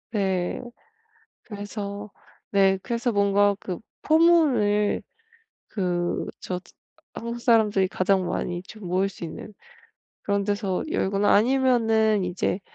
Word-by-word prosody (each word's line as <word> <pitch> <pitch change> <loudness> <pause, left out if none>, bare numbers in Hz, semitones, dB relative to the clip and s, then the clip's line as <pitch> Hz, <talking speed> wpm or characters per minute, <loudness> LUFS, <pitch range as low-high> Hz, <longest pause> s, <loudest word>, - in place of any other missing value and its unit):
네 190 -4 -1 0.8
그래서 205 -1 -6 0.4
네 195 -1 +3
그래서 235 +1 -1
뭔가 200 0 +3
그 180 -3 -5 0.2
포물을 285 -11 +3 0.7
그 175 -3 -1
저 180 -1 -4 0.5
한국 235 +1 -5
사람들이 215 -5 +3
가장 185 0 +1
많이 175 0 -3
좀 205 0 -10
모일 185 +2 +1
수 180 - -11
있는 200 +6 -9 0.7
그런 200 -1 0
데서 200 -2 -1
열거나 200 -6 +1
아니면은 225 -4 +3
이제 180 +2 -1
205 Hz, 210 characters per minute, -25 LUFS, 190-220 Hz, 0.8 s, 네